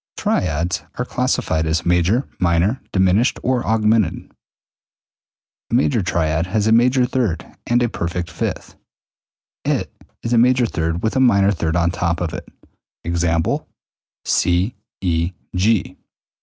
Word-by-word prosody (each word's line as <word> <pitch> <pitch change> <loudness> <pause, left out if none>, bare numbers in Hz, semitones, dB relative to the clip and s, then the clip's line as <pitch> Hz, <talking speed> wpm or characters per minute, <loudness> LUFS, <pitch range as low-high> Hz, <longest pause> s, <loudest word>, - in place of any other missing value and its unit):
197. 85 +1 -1
Triads - - -30
are 125 - 0
classified 125 -12 0
as 80 +2 0
major, 90 +9 +2
minor, 90 +7 +1
diminished, 95 +6 +2
or 125 -1 +1
augmented. 110 -3 +1 1.4
A - - 0
major 125 -2 +2
triad 85 -2 0
has 105 +2 0
a 110 - +3
major 125 +3 +4
third 120 -10 -1 0.2
and 120 +1 +2
a - - +2
perfect 85 -5 -4
fifth, 85 - -4 0.9
i.e., - - +2
it - - -3 0.3
is 115 - -1
a 115 - +5
major 125 +1 +4
third 80 -4 -2
with 110 - 0
a - - +2
minor 100 -6 +4
third 80 -3 -1
on 85 -1 +2
top 85 -1 -1
of 85 -3 -3
it. - - -7 0.6
Ex. 85 0 -1 1.0
C 90 +6 +1 0.3
E 85 -1 0 0.2
G. 100 +3 +1
95 Hz, 140 wpm, -20 LUFS, 85-115 Hz, 1.4 s, a